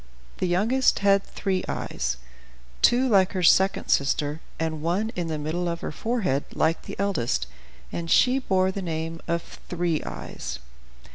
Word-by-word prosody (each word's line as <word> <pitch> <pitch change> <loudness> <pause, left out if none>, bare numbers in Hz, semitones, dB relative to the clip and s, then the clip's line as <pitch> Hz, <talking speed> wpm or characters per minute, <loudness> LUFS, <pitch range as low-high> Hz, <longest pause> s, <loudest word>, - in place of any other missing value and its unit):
The 185 - +1
youngest 225 +9 +3
had 195 0 +5
three 190 -2 -2
eyes, 65 0 -2 0.6
two 250 +2 +5
like 195 -5 +4
her 185 -2 -1
second 190 +3 +4
sister, 145 +2 +1 0.2
and 160 -1 -2
one 185 +7 0
in 175 -2 -2
the 160 -1 -2
middle 160 +4 -2
of 170 0 -4
her - - -3
forehead, 190 - 0
like 160 +1 +2
the - - -8
eldest, 120 - 0 0.5
and 170 -1 -4
she 255 +7 +5
bore 190 -6 +2
the 195 - -4
name 165 -1 -4
of 170 0 -3
"Three 175 -3 0
Eyes." - - -6
175 Hz, 155 wpm, -25 LUFS, 160-195 Hz, 0.6 s, had